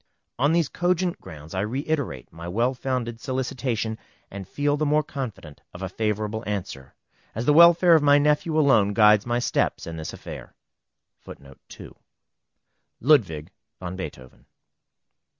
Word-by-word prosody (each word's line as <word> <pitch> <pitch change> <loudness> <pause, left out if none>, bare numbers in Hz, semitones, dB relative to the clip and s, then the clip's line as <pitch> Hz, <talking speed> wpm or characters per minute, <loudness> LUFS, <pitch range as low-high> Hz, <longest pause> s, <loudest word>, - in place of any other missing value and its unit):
On 145 +4 +3
these 165 -3 +2
cogent 180 +1 -1
grounds 75 0 -11
I 95 - -2
reiterate 130 - -3
my 85 +1 -9
well 115 +8 0
founded 125 -3 -4
solicitation, 125 -4 -3 0.3
and 95 -2 -8
feel 145 +6 0
the 150 - -2
more 150 +1 +2
confident 115 - -7
of 90 - -7
a 95 - -3
favorable 105 +2 -2
answer, 90 -10 -5 0.4
as 115 +3 -3
the 150 - +4
welfare 170 +2 +7
of 160 - +5
my 145 0 +5
nephew 150 +2 +1
alone 110 -9 +3
guides 105 0 +5
my 120 0 0
steps 120 - -1
in 85 -1 -7
this 80 - -6
affair. - - -10 2.4
LUDWIG 105 - +2 0.3
VAN 90 0 -6
BEETHOVEN. 65 -9 -9
120 Hz, 135 wpm, -24 LUFS, 95-145 Hz, 2.4 s, welfare